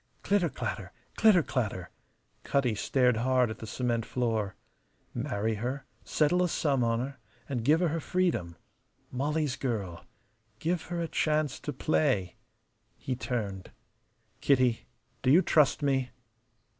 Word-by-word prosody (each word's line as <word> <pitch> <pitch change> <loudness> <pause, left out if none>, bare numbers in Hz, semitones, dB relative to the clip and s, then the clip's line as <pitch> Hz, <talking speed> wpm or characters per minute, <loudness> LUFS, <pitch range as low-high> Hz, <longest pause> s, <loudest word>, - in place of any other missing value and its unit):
Clitter 195 -4 +2
clatter! 110 -8 -5 0.2
Clitter 210 -7 +5
clatter! 110 - -3 0.5
Cutty 135 -5 +1
stared 125 +3 +2
hard 125 0 +2
at - - -8
the 110 - -7
cement 120 0 -1
floor. 110 -5 -1 0.6
Marry 115 -4 -1
her, 130 +3 -3 0.2
settle 170 +4 +2
a 180 - +2
sum 140 -6 +1
on 115 0 +1
her, 135 +2 -4 0.3
and 125 -4 -2
give 155 +7 +4
her 175 - +2
her 165 +2 -1
freedom. 160 - -1 0.6
Molly's 145 +1 -1
girl. 105 -11 -3 0.5
Give 165 +6 -1
her 175 -1 -4
a 165 - -1
chance 155 -3 0
to 150 - -4
play. 130 -9 +1 0.6
He 130 - -3
turned. 105 -7 -4 0.7
"Kitty, 130 -4 +2 0.3
do - - +1
you 170 +7 +6
trust 150 -1 +3
me?" 135 -2 +1
130 Hz, 135 wpm, -29 LUFS, 115-150 Hz, 0.7 s, you